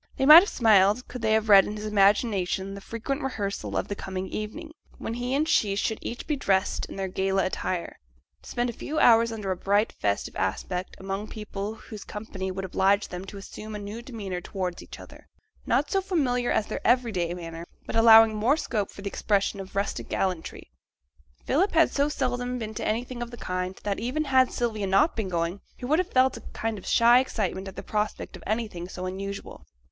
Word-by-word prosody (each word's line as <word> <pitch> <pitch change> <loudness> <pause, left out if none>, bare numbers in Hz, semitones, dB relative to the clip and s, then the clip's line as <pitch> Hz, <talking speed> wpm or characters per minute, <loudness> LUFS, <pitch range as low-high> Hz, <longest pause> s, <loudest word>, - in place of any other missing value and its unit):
They 265 - +1
might 305 +4 +12
have 395 - -1
smiled 215 0 +4
could 250 - -7
they 220 -1 +2
have 220 0 +2
read 200 -2 +8
in 210 - -4
his 210 - -6
imagination 195 -2 +2
the 200 - -8
frequent 235 +7 -4
rehearsals 205 -8 -3
of - - -1
the - - -3
coming 190 -1 -5
evening, 300 +10 -6 0.3
when 225 - -5
he 245 +2 -2
and 305 +3 +1
she 205 -9 +2
should 215 +2 -1
each 240 - -6
be 300 - 0
dressed 195 -7 0
in - - -9
their 195 -1 -2
gala 190 +1 0
attire, 185 -1 -3 0.4
to - - -13
spend 240 0 -1
a - - -14
few 305 +7 -5
hours 230 -4 +5
under 210 -4 -3
a - - 0
bright, 205 +4 +1
festive 100 -1 -2
aspect, 180 - -3
among 195 +2 -4
people 210 -1 -6
whose 215 -2 -10
company 205 -3 -6
would 190 +1 -4
oblige 195 +2 +2
them 180 +1 -6
to 200 +1 -9
assume 215 +2 -8
a - - -3
new 205 +3 -7
demeanour 205 -8 -5
towards 180 -2 -4
each - - -11
other, - - -14 0.4
not - - +1
so 390 - +2
familiar 265 -10 0
as 210 - +1
their - - -5
every 245 -2 +3
day 175 -4 -1
manner, 165 -1 -8 0.2
but - - -6
allowing 225 -1 +8
more 235 +8 +2
scope 215 -9 -2
for 200 - -11
the - - -3
expression 200 0 0
of 195 0 -9
rustic 200 +1 -2
gallantry. 180 - -3 0.7
Philip 370 +9 +2
had 325 0 +4
so 285 +1 +1
seldom 250 -3 -2
been 220 -2 -5
to - - -3
anything 240 +3 -2
of 240 - -4
the 240 - -10
kind, 185 -1 -4
that, 200 -1 -2
even 260 +6 -1
had 260 -3 +3
Sylvia 220 -4 -2
not 195 - +3
been 215 -4 -2
going, 170 +2 -2 0.2
he - - -7
would 305 +6 +2
have 365 - -1
felt 260 -1 +3
a - - -10
kind 225 -2 -3
of - - -13
shy 235 +1 +6
excitement 200 -7 -2
at 190 - -8
the - - -7
prospect 210 0 -3
of - - -11
anything 210 -6 -3
so 185 0 -6
unusual. 195 +2 -6
210 Hz, 215 wpm, -26 LUFS, 195-245 Hz, 0.7 s, might